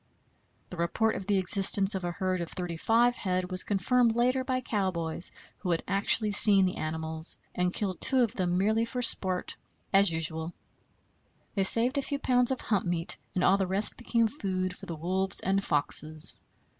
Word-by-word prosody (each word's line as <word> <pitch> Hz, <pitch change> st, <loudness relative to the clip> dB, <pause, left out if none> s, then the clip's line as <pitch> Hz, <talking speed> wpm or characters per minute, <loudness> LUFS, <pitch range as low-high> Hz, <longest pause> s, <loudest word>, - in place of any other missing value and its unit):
The 180 Hz, -, -9 dB
report 195 Hz, +6 st, -1 dB
of 195 Hz, -, -7 dB
the 205 Hz, -2 st, +1 dB
existence 195 Hz, +1 st, +4 dB
of 190 Hz, -2 st, -5 dB
a 175 Hz, -, -3 dB
herd 185 Hz, 0 st, -3 dB
of 170 Hz, -, -5 dB
thirty 180 Hz, -2 st, -5 dB
five 235 Hz, +7 st, +1 dB
head 185 Hz, -1 st, -3 dB
was 185 Hz, -, +1 dB
confirmed 225 Hz, +4 st, 0 dB
later 255 Hz, +2 st, 0 dB
by 255 Hz, -1 st, -2 dB
cowboys, 180 Hz, -8 st, +2 dB, 0.3 s
who 185 Hz, -, -5 dB
had 165 Hz, -1 st, -1 dB
actually 205 Hz, +2 st, +1 dB
seen 200 Hz, -1 st, +7 dB
the 185 Hz, -, -3 dB
animals, 160 Hz, +1 st, -3 dB, 0.2 s
and 180 Hz, 0 st, -1 dB
killed 190 Hz, -2 st, -4 dB
two 260 Hz, -2 st, +2 dB
of 230 Hz, -2 st, -2 dB
them 180 Hz, -5 st, -2 dB
merely 215 Hz, +4 st, +1 dB
for 245 Hz, +2 st, -3 dB
sport, 185 Hz, -5 st, 0 dB, 0.4 s
as 195 Hz, -2 st, +4 dB
usual. 160 Hz, +1 st, -3 dB, 1.0 s
They 195 Hz, -2 st, 0 dB
saved 245 Hz, +7 st, +2 dB
a -, -, -1 dB
few 280 Hz, +1 st, -3 dB
pounds 250 Hz, -3 st, +1 dB
of 265 Hz, -, 0 dB
hump 200 Hz, -5 st, -2 dB
meat, 175 Hz, -1 st, 0 dB, 0.2 s
and 180 Hz, -, -1 dB
all 190 Hz, +2 st, +3 dB
the 190 Hz, -, -1 dB
rest 195 Hz, +3 st, -1 dB
became 235 Hz, -1 st, 0 dB
food 185 Hz, -7 st, -4 dB
for -, -, -13 dB
the 170 Hz, -, -6 dB
wolves 185 Hz, +4 st, -1 dB
and 195 Hz, +1 st, -1 dB
foxes. 155 Hz, 0 st, +3 dB
190 Hz, 185 wpm, -27 LUFS, 175-225 Hz, 1.0 s, seen